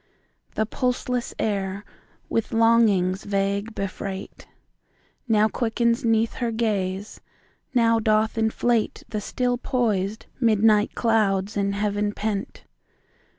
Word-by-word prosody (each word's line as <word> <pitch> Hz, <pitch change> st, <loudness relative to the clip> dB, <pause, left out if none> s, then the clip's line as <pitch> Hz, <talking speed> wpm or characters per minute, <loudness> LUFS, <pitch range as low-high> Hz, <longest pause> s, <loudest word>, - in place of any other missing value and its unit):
The 220 Hz, -, +1 dB
pulseless 250 Hz, +1 st, -2 dB
air, 200 Hz, -1 st, -2 dB, 0.4 s
with 225 Hz, 0 st, -2 dB
longings 220 Hz, -5 st, +3 dB
vague 200 Hz, +2 st, -1 dB
befreight, 195 Hz, 0 st, -6 dB, 0.8 s
Now 215 Hz, -2 st, +4 dB
quickens 235 Hz, +2 st, 0 dB
'neath 225 Hz, -1 st, +2 dB
her 240 Hz, -, +1 dB
gaze, 205 Hz, -3 st, -2 dB, 0.5 s
now 230 Hz, -1 st, +4 dB
doth 215 Hz, 0 st, +2 dB
inflateThe 220 Hz, -1 st, -1 dB
still 245 Hz, +3 st, -1 dB
poised 215 Hz, -6 st, -1 dB
midnight 215 Hz, -3 st, +3 dB
clouds 210 Hz, -4 st, +1 dB
in 200 Hz, -1 st, 0 dB
heaven 205 Hz, 0 st, -1 dB
pent. 205 Hz, -2 st, -4 dB
215 Hz, 100 wpm, -24 LUFS, 200-230 Hz, 0.8 s, Now